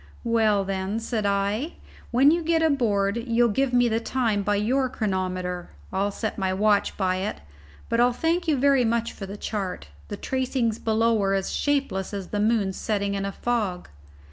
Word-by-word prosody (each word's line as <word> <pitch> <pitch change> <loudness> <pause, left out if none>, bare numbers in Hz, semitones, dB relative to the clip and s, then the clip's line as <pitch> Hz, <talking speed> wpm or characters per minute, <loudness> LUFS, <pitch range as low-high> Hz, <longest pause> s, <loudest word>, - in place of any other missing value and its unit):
"Well 220 -4 +2
then," 195 +2 -2
said 225 -2 -2
I, 200 0 +1
"if, 305 +6 -4 0.4
when 265 +4 +5
you 340 +1 +1
get 325 0 +1
aboard, 220 -9 +2
you'll 235 0 +2
give 265 +5 +1
me 245 -1 +4
the 225 -1 +1
time 230 -4 0
by 205 +1 +1
your 255 +6 +1
chronometer, 185 -6 -2 0.2
I'll 195 +2 +1
set 215 +1 -4
my 190 -1 0
watch 205 0 +2
by 185 -2 +1
it; 195 +3 -3 0.5
but 230 - 0
I'll 245 +1 +5
thank 330 +7 0
you 305 -3 +2
very 275 -1 +4
much 235 0 0
for 195 - -7
the 200 +2 -7
chart. 195 - -4 0.2
The - - -6
tracings 255 -4 -1
below 225 0 +2
are 195 0 +2
as 195 -1 -2
shapeless 275 -10 -1
as 195 -2 -6
the 205 - -2
moon 210 -2 +2
setting 200 0 -1
in 195 0 -2
a 200 - -2
fog." 210 -6 -2
220 Hz, 190 wpm, -25 LUFS, 195-245 Hz, 0.5 s, when